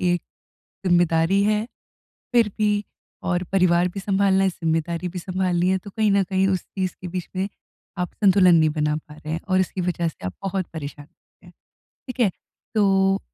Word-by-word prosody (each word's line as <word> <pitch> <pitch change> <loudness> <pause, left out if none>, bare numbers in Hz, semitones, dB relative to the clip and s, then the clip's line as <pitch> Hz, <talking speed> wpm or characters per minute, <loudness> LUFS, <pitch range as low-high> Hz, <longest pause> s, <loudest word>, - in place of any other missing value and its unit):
एक 175 -1 +1 0.6
ज़िम्मेदारी 175 +1 +3
है 215 +1 +1 0.7
फिर 230 -3 +4
भी 210 -1 +1 0.5
और 175 0 +1
परिवार 180 -2 +3
भी 195 +2 -6
सँभालना 195 -1 +2
है, 190 - +3
ज़िम्मेदारी 165 +1 -2
भी 180 - -6
सँभालनी 180 -1 0
है, 190 - +2
तो 195 +2 -10
कहीं 215 0 +1
न 200 -1 +4
कहीं 190 +1 +1
उस 190 -2 +1
चीज़ 185 -2 -4
के 180 - -5
बीच 180 -1 -4
में 190 +1 0 0.5
आप 180 0 -3
संतुलन 190 -4 +5
नहीं 160 -1 +4
बना 150 -1 0
पा 150 0 -8
रहे 155 0 -6
हैं 165 - -3
और 185 0 +3
इसकी 185 0 -1
वजह 175 -1 -1
से 150 - -7
आप 90 - -3
बहुत 190 -1 -1
परेशान 145 -1 -7 0.4
हैं, - - -15 0.6
ठीक 255 0 -7
है? 225 -5 +4 0.5
तो 195 -2 +3
185 Hz, 185 wpm, -23 LUFS, 170-195 Hz, 0.7 s, संतुलन